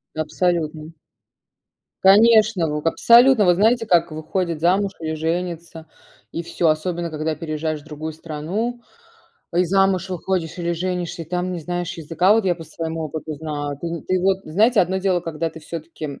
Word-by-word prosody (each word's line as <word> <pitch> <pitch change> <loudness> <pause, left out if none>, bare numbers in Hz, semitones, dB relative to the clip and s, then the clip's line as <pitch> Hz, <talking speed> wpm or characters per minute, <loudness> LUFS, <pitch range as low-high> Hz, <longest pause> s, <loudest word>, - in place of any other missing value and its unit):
Абсолютно. 155 0 -1 1.1
Конечно, 210 -2 +5
ву 150 0 -2
абсолютно. 235 +6 +5
Вот 180 -1 +5
знаете, 225 +4 +3
как 170 -4 +3
выходит 160 +2 -3
замуж, 195 +4 +2
или 160 -1 -3
женится, 165 0 -4 0.4
и 170 - -4
всё, 170 0 -1
особенно 170 +2 0
когда 155 0 -2
переезжаешь 155 0 -3
в - - -21
другую 155 +1 -6
страну, 170 +10 -4 0.7
и 180 +1 +3
замуж 190 0 +2
выходишь, 180 -2 -2
или 170 0 -1
женишься, 175 0 -3
и - - -8
там 180 +3 -2
не 175 - -4
знаешь 175 +2 -3
языка. 165 +4 +2
Вот 225 -1 +2
я 180 -2 +2
по 165 - -9
своему 160 +1 -5
опыту 155 +1 -5
знаю. 145 -2 -5
Ты - - -4
нь 165 -1 -5
ты 185 0 0
вот, 190 +1 +2
знаете, 215 +8 +3
одно 185 +1 +1
дело, 190 -2 +1
когда 165 0 -3
ты 160 0 -12
всё-таки, 160 0 -8
м, 140 -2 -8
170 Hz, 170 wpm, -21 LUFS, 160-185 Hz, 1.1 s, Конечно